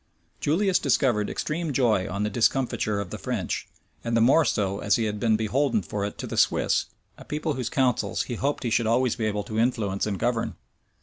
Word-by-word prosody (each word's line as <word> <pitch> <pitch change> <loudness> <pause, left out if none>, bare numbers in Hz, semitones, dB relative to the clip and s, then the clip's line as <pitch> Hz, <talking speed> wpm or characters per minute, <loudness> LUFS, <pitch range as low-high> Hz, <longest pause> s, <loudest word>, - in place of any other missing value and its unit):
{1513.} 150 +3 +1
Julius 195 -2 +2
discovered 110 -7 +1
extreme 160 0 -2
joy 115 -8 +2
on 100 +2 -2
the 105 - 0
discomfiture 115 -2 +1
of 100 -3 -5
the - - -5
French; - - -3 0.4
and 115 0 0
the - - +4
more 135 +8 +5
so 100 -6 0
as 100 - +2
he 115 - 0
had 105 -1 -2
been 110 0 +3
beholden 115 +1 +1
for 100 +4 -4
it 100 - -6
to - - -5
the - - -5
Swiss, - - +2 0.3
a - - -10
people 150 +1 -2
whose 130 -3 -3
councils 125 -6 +1
he 125 - -5
hoped 140 +5 -1
he 120 - -1
should 115 0 +2
always 120 +1 +2
be 115 - -2
able 105 -1 -1
to 110 +2 -3
influence 110 -5 0
and 100 -2 -2
govern. 120 +2 -1
115 Hz, 220 wpm, -26 LUFS, 105-130 Hz, 0.4 s, more